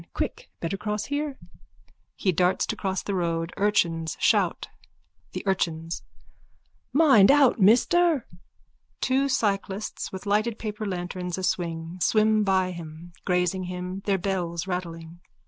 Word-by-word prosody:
Quick. - - -3
Better 170 +4 -3
cross 210 +1 -3
here. 290 -1 -3 0.8
(He 190 - +1
darts 180 +2 +2
to - - -3
cross 190 -2 -2
the 200 - -3
road. 170 -2 -1
Urchins 170 -6 +1
shout.) - - +2 0.7
THE - - -4
URCHINS: 165 -4 -1 0.9
Mind 270 -10 +6
out, 275 -4 +5
mister! 270 - +4 0.7
(_Two 270 +2 +1
cyclists, 205 -5 -1
with 190 +1 -7
lighted 215 +3 +1
paper 215 -1 -4
lanterns 180 -1 -4
aswing, 170 -2 -2
swim 215 +1 +3
by 190 -2 +2
him, 170 0 -9
grazing 180 0 +1
him, 180 +1 -5
their 200 -2 +2
bells 175 -3 -2
rattling. 170 -2 -5
190 Hz, 125 wpm, -26 LUFS, 175-215 Hz, 0.9 s, Mind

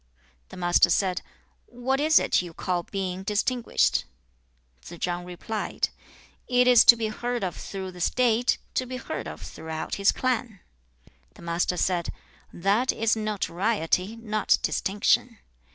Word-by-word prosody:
2. - - -11
The - - -11
Master 175 -1 +4
said, 185 -2 +1 0.5
'What 255 +3 -2
is 310 +1 +4
it - - +3
you 175 -2 -9
call 180 -1 -1
being 185 +1 -4
distinguished?' 215 +5 +1 0.8
3. 175 - -10
Tsze - - -20
chang 175 0 -2
replied, 190 +4 -3 0.6
'It 250 0 +3
is 245 -2 +8
to 235 - +10
be 225 -2 -2
heard 240 +1 -3
of 180 -2 -2
through 190 -1 -6
the 180 -1 -11
State, 245 +4 +2 0.2
to 255 - -1
be 255 +1 -5
heard - - -5
of - - -8
throughout 160 0 -6
his 200 0 +4
clan.' 245 -5 -2 0.5
4. - - -25 0.2
The - - -15
Master 170 +1 -1
said, 175 -1 0 0.4
'That 205 +8 +1
is 225 0 +1
notoriety, 205 -2 -1
not 215 -2 +1
distinction. 210 +4 +1
205 Hz, 150 wpm, -26 LUFS, 180-240 Hz, 0.8 s, to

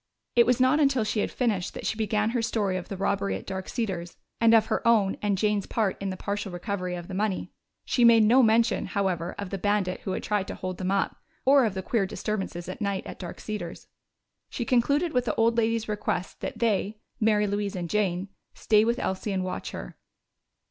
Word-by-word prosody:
It 235 -1 +6
was 250 0 +3
not 260 +4 +4
until 275 -5 +3
she 215 0 -1
had - - 0
finished 215 -8 -1
that - - -6
she - - 0
began 215 0 0
her 240 -1 0
story 210 -4 0
of 180 -1 -5
the 195 - -5
robbery 190 - 0
at 95 - -7
Dark 190 -1 -5
Cedars 190 -7 -3 0.2
and 230 0 +6
of 220 -1 +5
her - - -1
own 210 -4 +4
and 205 -2 +1
Jane's 210 0 +1
part 215 -4 0
in 195 - -2
the 185 - -4
partial 200 0 -3
recovery 180 0 -3
of 175 -1 -7
the - - -7
money. 200 0 -1 0.3
She 245 - +2
made 230 -1 +7
no 240 +5 +6
mention, 230 0 +3
however, 180 -4 -1
of 200 -2 -5
the 195 - -3
bandit 205 -2 0
who 190 - -4
had - - -3
tried 205 -2 0
to - - -5
hold 185 -1 -5
them 185 -1 -1
up, 195 0 0 0.3
or 270 -1 +6
of 210 -3 -2
the 190 - -3
queer 205 -3 0
disturbances 190 -4 -4
at 185 +6 -7
night 200 -2 -1
at - - -8
Dark 175 -2 -7
Cedars. 210 -6 -6 0.6
She 240 - -4
concluded 280 +8 +2
with 250 -1 +1
the - - -1
old 230 +1 +3
lady's 230 -1 +1
request 205 -3 -3
that - - -5
they 215 -2 0 0.2
Mary 215 -1 +3
Louise 205 -1 -2
and 175 -2 -3
Jane 190 -1 0 0.3
stay 215 -1 +3
with 235 +2 +1
Elsie 190 +2 -2
and 190 -1 -1
watch 185 - -4
her. - - -8
210 Hz, 220 wpm, -27 LUFS, 190-230 Hz, 0.6 s, made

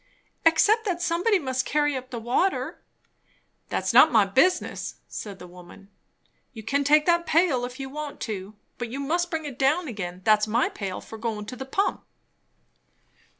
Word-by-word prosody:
"Except 420 +8 +4
that 360 -4 -1
somebody 355 +5 +2
must 260 -5 -2
carry 295 0 +1
up 255 0 -6
the 245 - -6
water." 255 - -1 0.9
"That's - - -1
not 315 - +8
my 220 -4 +5
business," 300 - +1
said 200 -3 -7
the 180 - -11
woman. 180 +2 -14 0.6
"You 220 -2 -9
can 280 +6 0
take 300 +2 +4
that 340 -1 +2
pail 305 -7 +2
if 250 +2 -9
you 270 - -4
want 295 +1 -7
to; 205 -1 -5 0.2
but 240 -1 -4
you 265 +4 -5
must 340 +5 0
bring 320 -2 -3
it 275 -3 -7
down 300 +6 +2
again. 185 -6 -6
That's 215 0 +4
my 230 +4 +1
pail 195 -3 -5
for 225 - -10
goin' 220 -2 -3
to 230 - -7
the 265 - -7
pump." 390 +9 -1
265 Hz, 175 wpm, -25 LUFS, 220-320 Hz, 0.9 s, not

